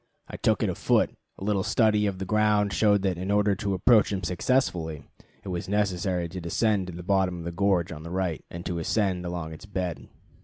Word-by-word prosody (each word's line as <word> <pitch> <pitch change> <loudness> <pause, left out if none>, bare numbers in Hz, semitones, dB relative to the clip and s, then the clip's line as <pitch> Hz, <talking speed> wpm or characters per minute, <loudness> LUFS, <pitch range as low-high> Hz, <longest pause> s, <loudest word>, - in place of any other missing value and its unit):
I - - -8
took - - +1
it - - +1
afoot. - - +2 0.3
A - - -8
little 100 -1 +1
study 105 0 +2
of 100 -2 -2
the 95 - -4
ground 105 -1 +2
showed 100 +2 +3
that 95 -3 0
in 95 +2 -4
order 105 0 +3
to 100 -1 -1
approach 110 +3 +4
him 95 -2 -2
successfully, 85 - 0 0.4
it 100 - -7
was 90 0 -4
necessary 95 -3 0
to 90 +1 -6
descend 95 +3 +1
to 90 - -7
the 90 +1 -7
bottom 95 -1 +1
of 85 - -7
the 85 - -3
gorge 90 -1 +1
on 75 -2 -7
the 85 - -8
right, 90 -3 -2
and 85 +1 -8
to 85 -2 -2
ascend 90 0 0
along 85 -2 -4
its 80 +6 -11
bed. 90 -4 -4
95 Hz, 220 wpm, -27 LUFS, 85-105 Hz, 0.4 s, approach